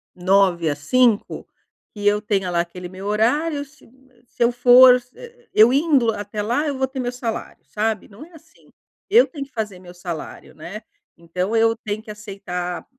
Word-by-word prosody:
9h 180 -4 +2
às 145 - -14
17h 235 - 0 0.4
que 205 - -6
eu 205 0 +3
tenha 195 -3 -1
lá 170 - 0
aquele 175 +1 -5
meu 190 +2 -10
horário, 285 +9 0
se 290 -1 -20 0.4
se 240 - -2
eu 235 - +3
for 245 +1 +7
s 250 0 -6
eh, 480 -1 -14
eu 220 +3 +6
indo 275 -6 +3
até 205 0 -5
lá, 285 +8 -1
eu 280 - -3
vou 265 0 0
ter 265 0 -7
meu 245 -1 -2
salário, 235 -2 -6
sabe. 220 +1 -2
Não 210 +8 -13
é 345 - -21
assim. 320 0 -20 0.4
Eu 470 +4 +6
tenho 285 -4 -7
que 275 - -25
fazer 210 -6 -5
meu 180 -1 -13
salário, 175 -3 -8
né. 195 +8 -9 0.3
Então 180 +6 -3
eu 225 0 +3
tenho 215 +1 -4
que 215 - -9
aceitar 195 -4 -6
215 Hz, 190 wpm, -21 LUFS, 190-255 Hz, 0.4 s, for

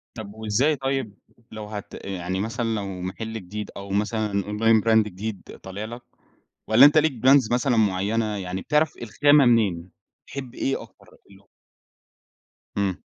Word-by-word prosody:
طَب 105 -3 -8
وإزاي 110 +8 +1
طيب 135 -6 -3 0.3
لو 110 -1 -7
هت 105 -1 -8
يعني 95 -1 -3
مثلًا 115 +3 -2
لو 95 -3 -5
محل 110 +5 -5
جديد 105 0 -6
أو 100 0 -8
مثلًا 105 0 -1
online 110 +1 +2
brand 110 -1 +5
جديد 105 +1 -6 0.2
طالع 100 +3 -6
لك، 120 +2 -8 0.7
والّا 120 +6 +8
أنت 150 +2 +6
ليك 155 0 +4 0.2
brands 135 -4 +5
مثلًا 125 -1 +1
معينة 105 +2 +1
يعني 95 0 -4
بتعرف 150 - +1
الخامة 145 +5 +4
منين، 95 -7 +2 0.4
تحب 130 -3 -7
إيه 135 - -1
أكتر؟ - - -20 1.6
إمم. 100 -3 0
110 Hz, 140 wpm, -24 LUFS, 100-120 Hz, 1.6 s, والّا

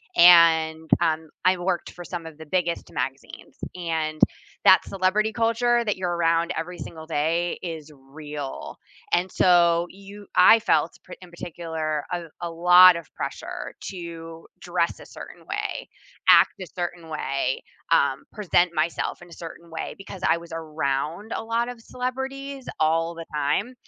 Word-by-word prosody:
and, 160 -2 +6
um, 160 -2 0 0.2
I 185 0 +5
worked 175 0 -2
for 175 - -10
some 175 -1 -6
of 160 -2 -10
the 160 - -10
biggest 170 +1 -2
magazines. - - -6 0.2
And 160 -3 -2 0.5
that 185 - +7
celebrity 200 +3 +1
culture, 235 +1 +2
that 210 - 0
you're 180 -2 -2
around 165 0 +2
every 175 +2 -5
single 160 -2 -9
day, 165 +3 0
is 160 -3 -6 0.2
real, 150 -3 -7 0.4
and, 180 +1 +2
so, 170 -1 +4
you 200 +1 -13
I 220 +5 +8
felt, 165 -7 +2 0.2
p - - -9
in 180 - -12
particular, 160 -3 -4
a 175 - -1 0.3
a - - -6
lot 180 +2 +8
of 170 - -6
pressure - - -5 0.2
to 165 -2 -8 0.2
dress - - 0
a - - -12
certain - - -10
way, - - -3 0.4
act - - +7
a 185 - -6
certain 175 -1 -4
way, 135 -3 -2 0.3
um, 135 -1 +1 0.2
present 180 -3 +3
myself 170 +1 -4
in 175 - -15
a - - -12
certain 170 +1 -10
way, - - -4
because 195 -1 -10
I - - -1
was 170 0 -12
around 155 - -3
a - - -4
lot 230 +1 0
of 240 -2 -9
celebrities 265 +2 -5
all 165 +2 +1
the 165 0 -7
time, 150 - 0
170 Hz, 155 wpm, -24 LUFS, 160-185 Hz, 0.5 s, I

